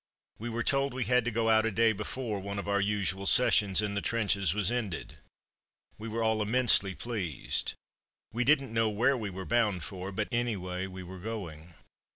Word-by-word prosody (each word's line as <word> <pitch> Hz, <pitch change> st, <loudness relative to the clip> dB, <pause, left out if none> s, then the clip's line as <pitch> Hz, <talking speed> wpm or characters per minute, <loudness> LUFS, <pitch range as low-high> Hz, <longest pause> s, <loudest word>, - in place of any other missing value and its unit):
We 120 Hz, +3 st, -4 dB
were 115 Hz, 0 st, -2 dB
told 135 Hz, -1 st, +1 dB
we 130 Hz, -, -1 dB
had 125 Hz, +2 st, +2 dB
to -, -, +1 dB
go 115 Hz, 0 st, 0 dB
out 110 Hz, 0 st, +5 dB
a 115 Hz, -, +1 dB
day 115 Hz, +1 st, +3 dB
before 105 Hz, +1 st, -4 dB
one 100 Hz, +1 st, -5 dB
of 100 Hz, -, -4 dB
our 100 Hz, 0 st, +1 dB
usual 100 Hz, -1 st, -1 dB
sessions 105 Hz, -5 st, +5 dB
in 105 Hz, -1 st, -2 dB
the 100 Hz, -, -1 dB
trenches 100 Hz, -6 st, +1 dB
was 105 Hz, +3 st, 0 dB
ended. 100 Hz, -9 st, -4 dB, 0.8 s
We 110 Hz, -, -6 dB
were 115 Hz, +1 st, -2 dB
all 110 Hz, -1 st, +2 dB
immensely 105 Hz, -3 st, +3 dB
pleased. 100 Hz, -, -3 dB, 0.6 s
We 120 Hz, +2 st, 0 dB
didn't 135 Hz, -3 st, +2 dB
know 115 Hz, -1 st, +2 dB
where 120 Hz, +6 st, +2 dB
we 110 Hz, -5 st, -4 dB
were 95 Hz, 0 st, -7 dB
bound 105 Hz, -7 st, +1 dB
for, 95 Hz, 0 st, -6 dB
but, 105 Hz, +2 st, -2 dB
anyway, 95 Hz, -6 st, -2 dB
we 95 Hz, 0 st, -8 dB
were 95 Hz, +1 st, -9 dB
going. 90 Hz, -6 st, -7 dB
105 Hz, 195 wpm, -30 LUFS, 95-115 Hz, 0.8 s, out